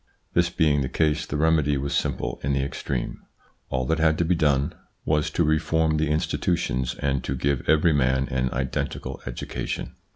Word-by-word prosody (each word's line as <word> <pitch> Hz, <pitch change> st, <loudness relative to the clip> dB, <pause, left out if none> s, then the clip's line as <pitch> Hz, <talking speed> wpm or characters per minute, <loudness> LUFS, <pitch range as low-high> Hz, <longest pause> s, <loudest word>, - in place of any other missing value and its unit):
This 85 Hz, 0 st, +3 dB
being 75 Hz, -5 st, +2 dB
the 65 Hz, -, -1 dB
case 75 Hz, -1 st, +1 dB
the 70 Hz, -, -2 dB
remedy 75 Hz, -2 st, +3 dB
was 70 Hz, +1 st, -2 dB
simple -, -, -1 dB
in 70 Hz, +1 st, 0 dB
the 70 Hz, 0 st, +1 dB
extreme: 70 Hz, -2 st, -3 dB, 0.5 s
all 65 Hz, -1 st, -1 dB
that 80 Hz, +5 st, 0 dB
had 80 Hz, -1 st, +3 dB
to 85 Hz, -, +1 dB
be 90 Hz, -, +3 dB
done 75 Hz, -4 st, +2 dB, 0.3 s
was 75 Hz, -1 st, +2 dB
INTRODUCTION -, -, -1 dB
xv -, -, -18 dB
to 85 Hz, -, +3 dB
reform 80 Hz, 0 st, +2 dB
the 75 Hz, -1 st, +1 dB
institutions 75 Hz, -4 st, 0 dB
and 70 Hz, -2 st, -1 dB
to 65 Hz, -, -2 dB
give 70 Hz, 0 st, -1 dB
every 80 Hz, +1 st, +5 dB
man 65 Hz, -1 st, +2 dB
an 65 Hz, -1 st, 0 dB
identical 65 Hz, 0 st, -3 dB
education. -, -, -4 dB
75 Hz, 190 wpm, -25 LUFS, 65-80 Hz, 0.5 s, every